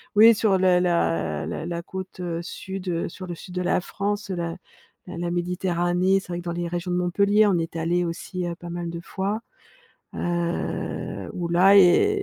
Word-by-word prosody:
oui 225 +2 +8
sur 205 -3 +3
le 185 -1 +4
la 85 - 0
la 155 - -4
la 170 0 -3
côte, 190 0 -7
heu, 170 -2 -3
sud, 190 +2 -6
heu, 170 -1 -1
sur 185 +2 -9
le 175 - -5
sud 180 +3 -11
de 180 - 0
la 180 - +2
France, 205 +2 -3
la 170 -1 -3 0.5
la 180 - -7
la 170 0 -2
méditerranée, 180 +1 +1
c'est - - -13
vrai 175 0 -3
que - - -8
dans 170 - -2
les 175 0 -2
régions 175 +1 -3
de 180 - +1
Montpellier, 200 +4 +3
on 185 -3 +3
est 165 0 -4
allé 175 +2 +1
aussi, 175 +2 -4
heu, 170 - -3
pas 175 0 -9
mal 175 0 -4
de 170 0 -5
fois, 200 +4 -3 0.7
heu, 175 0 -2
où 175 -2 -3
là 185 +4 +6
et 300 - +5
175 Hz, 200 wpm, -24 LUFS, 170-190 Hz, 0.7 s, oui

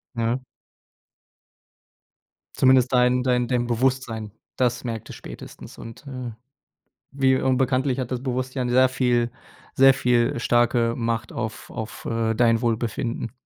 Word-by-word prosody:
Ja. 115 +2 0 2.2
Zumindest 130 -1 +4
dein 125 0 +3
dein 125 -1 +1
dein 125 -1 0
Bewusstsein, 120 -3 -1 0.3
das 125 -2 0
merkt 115 -3 -5
es - - -8
spätestens - - -11
und, 115 +5 -10
äh, 130 -3 -6 0.8
wie 135 -1 +2
und 130 -1 +1
bekanntlich 130 0 +1
hat 130 -2 -3
das 125 -1 -3
Bewusstsein 130 -1 -2
sehr 130 +1 +5
viel 125 -2 +1 0.4
sehr 135 0 +7
viel 120 -2 +1
starke 120 -1 +2
Macht 115 -2 -2
auf 110 -1 -5
auf, 110 -2 -7
äh, 115 -1 0
dein 115 0 +3
Wohlbefinden. 115 +1 -2
125 Hz, 130 wpm, -24 LUFS, 115-130 Hz, 2.2 s, sehr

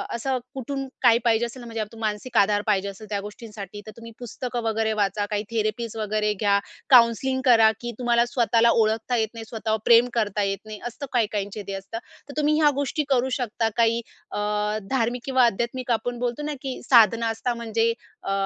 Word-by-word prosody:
असं 260 +2 -1 0.2
कुठून 270 +1 -4 0.2
काय 235 -2 +6
पाहिजे 230 0 +3
असेल 240 +2 -8
ना 240 - -10
म्हणजे 225 -1 -4
अप 210 - -3
तू 230 - -13
मानसिक 220 +3 -3
आधार 205 +1 +4
पाहिजे 200 -2 +1
असेल 205 +2 -10
त्या 205 - -1
गोष्टींसाठी 210 -1 -9
तर 215 - -8
तुम्ही 230 0 -10
पुस्तकं 245 +1 -5
वगैरे 220 0 0
वाचा, 205 0 +1
काही 210 0 -1
थेरपीज 225 +1 -2
वगैरे 210 0 0
घ्या, 200 0 +2 0.3
काउन्सलिंग 255 +2 +5
करा, 225 -3 +6
की 240 - -4
तुम्हाला 240 -1 +3
स्वतःला 235 -1 +3
ओळखता 225 +2 +1
येत 220 - +1
नाही, 225 -1 -8
स्वतःवर 220 -1 -2
प्रेम 235 +1 +6
करता 210 -3 0
येत 195 0 -1
नाही. 215 -1 -8
असतं 245 +4 -7
काही-काहींचे 210 -3 -1
ते 195 - -4
असतं. 195 +3 -6 0.3
तर - - -7
तुम्ही 300 0 +2
ह्या 300 - +6
गोष्टी 285 +2 -1
करू 260 -1 +2
शकता. 230 -2 -1
काही 230 0 +3 0.3
अ, - - -4 0.5
धार्मिक 245 -1 0
किंवा 260 -2 +4
आध्यात्मिक 235 +3 -1
आपण 240 +1 -1
बोलतो 245 +3 -2
ना 300 0 -2
की 265 -2 -5
साधना 230 -1 +6
असतात 230 +2 -2
म्हणजे 230 0 0 0.3
अ, 195 - -3
230 Hz, 195 wpm, -24 LUFS, 215-245 Hz, 0.5 s, काय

